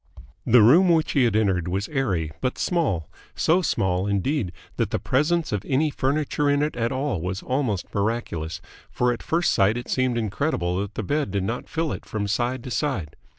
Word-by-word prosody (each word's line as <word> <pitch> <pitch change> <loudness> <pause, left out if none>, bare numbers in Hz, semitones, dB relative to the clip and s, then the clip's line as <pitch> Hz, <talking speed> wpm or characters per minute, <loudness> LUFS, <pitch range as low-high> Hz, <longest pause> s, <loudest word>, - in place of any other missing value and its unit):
The 120 -1 +7
room 170 - +6
which 160 -2 +3
he 135 -3 +3
had 115 -3 +1
entered 95 -6 +1
was 95 +3 -1
airy 95 - -1
but 130 - -1
small, 135 - 0 0.3
so 175 +4 +3
small, 95 - 0
indeed, 100 - 0 0.3
that - - 0
the - - 0
presence 155 +5 +1
of 105 -3 -1
any 145 +3 +1
furniture 145 +1 0
in 145 0 +2
it 150 - -2
at 115 -1 -1
all 130 - -1
was 95 +3 -4
almost 125 -8 -2
miraculous, 100 -7 -2 0.3
for 125 0 +1
at 115 - -7
first 170 +2 +1
sight 105 +2 +3
it 120 - -6
seemed 130 -2 +1
incredible 100 - -1
that 100 0 -6
the 110 - -3
bed 145 +5 -1
did 100 0 -1
not 115 +5 -4
fill 160 -1 -1
it - - -5
from 105 -2 -2
side 120 +4 -1
to 125 - -7
side. 115 - -2
120 Hz, 195 wpm, -24 LUFS, 100-145 Hz, 0.3 s, The